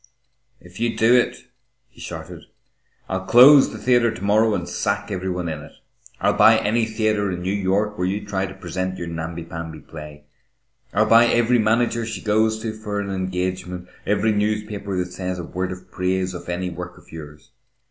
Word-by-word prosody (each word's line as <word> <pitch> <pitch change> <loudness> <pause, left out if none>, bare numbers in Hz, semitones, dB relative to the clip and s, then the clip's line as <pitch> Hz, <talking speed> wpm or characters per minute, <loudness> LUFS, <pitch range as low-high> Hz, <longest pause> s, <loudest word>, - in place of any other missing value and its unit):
"If 90 +2 -14
you 115 0 -1
do 115 +2 +5
it," 125 - +2 0.5
he - - -17
shouted, - - -8 0.6
"I'll 95 0 -3
close 135 +4 +8
the - - -7
theatre 120 -2 +3
to 110 -3 -7
morrow 105 +2 +3
and 90 -2 -4
sack 100 +3 -2
every 95 -1 -3
one 90 -1 -3
in 80 -2 -4
it. 75 - -13 0.5
I'll - - +2
buy - - +6
any 115 +2 +1
theatre 110 -3 0
in 90 -1 -4
New 95 +2 -1
York 100 +1 0
where 90 - +1
you 100 +2 -3
try 95 -1 -2
to 95 - -9
present 95 0 -4
your 85 - -5
namby 85 0 -5
pamby 85 -1 -7
play. 75 -1 -11 0.7
I'll 105 +2 +3
buy 115 +2 +6
every 120 +1 +3
manager 115 +2 +1
she - - -4
goes 110 +1 +1
to 110 -1 -3
for 105 -2 -4
an 100 -1 -3
engagement, 90 -1 -3 0.2
every 105 +2 +2
newspaper 105 -2 -2
that 90 0 -2
says 90 0 -4
a 90 - -5
word 90 +2 -3
of 90 0 -10
praise 90 0 -1
of 85 0 -8
any 90 +1 -2
work 90 +1 -8
of - - -19
yours. 75 +4 -11
95 Hz, 190 wpm, -22 LUFS, 90-110 Hz, 0.7 s, close